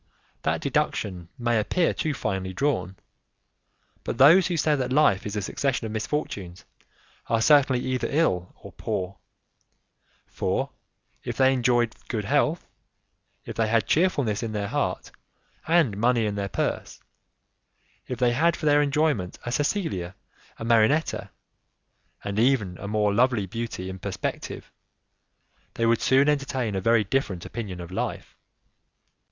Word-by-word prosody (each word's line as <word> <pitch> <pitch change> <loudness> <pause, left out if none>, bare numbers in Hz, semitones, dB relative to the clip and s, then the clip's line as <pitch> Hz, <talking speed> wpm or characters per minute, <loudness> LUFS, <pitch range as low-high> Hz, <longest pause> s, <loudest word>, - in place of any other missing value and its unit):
That - - -1
deduction 90 -4 -1
may 120 -2 +1
appear 170 +10 +1
too 155 -2 -2
finely 95 -5 -3
drawn. 95 - -1 1.1
But - - -4
those 165 +7 +7
who 175 -2 -1
say 155 -1 +2
that 130 -2 -2
life 130 -9 +3
is 105 - -5
a 105 - -2
succession 125 +3 -1
of 110 - -4
misfortunes 105 - -4 0.6
are 115 - +1
certainly 135 0 +4
either 125 -2 -1
ill 95 - +1
or - - -10
poor; 95 +1 -4 1.1
for, - - -2 0.5
if - - -5
they 130 0 +5
enjoyed 120 -2 +2
good 105 -4 -3
health, 150 +7 +1 0.8
if - - -7
they 115 -1 +1
had 115 -1 +2
cheerfulness 140 - +1
in 115 -2 -4
their 100 -1 -2
heart - - -2 0.6
and 160 - +3
money 115 +1 +2
in 105 - -1
their 100 -1 -3
purse, - - -3 1.1
if 125 - -4
they 125 -2 +3
had 160 +7 +2
for - - -6
their 145 0 +5
enjoyment 145 - 0
a 120 - -3
Cecilia, 120 - -1 0.4
a 115 - -6
Marinetta, 115 +7 +2 0.9
and 100 +1 -2
even 115 -7 +2
a 100 - -6
more 105 -1 +1
lovely 120 -2 +2
beauty 110 -2 -5
in 95 0 -7
perspective, - - -5 1.0
they 115 - 0
would 115 0 +3
soon 135 +2 +4
entertain 135 -6 0
a 95 - -1
very 115 +2 +3
different 100 -5 -2
opinion 100 -6 -6
of 85 0 -8
life! 95 - -4
115 Hz, 145 wpm, -25 LUFS, 100-140 Hz, 1.1 s, those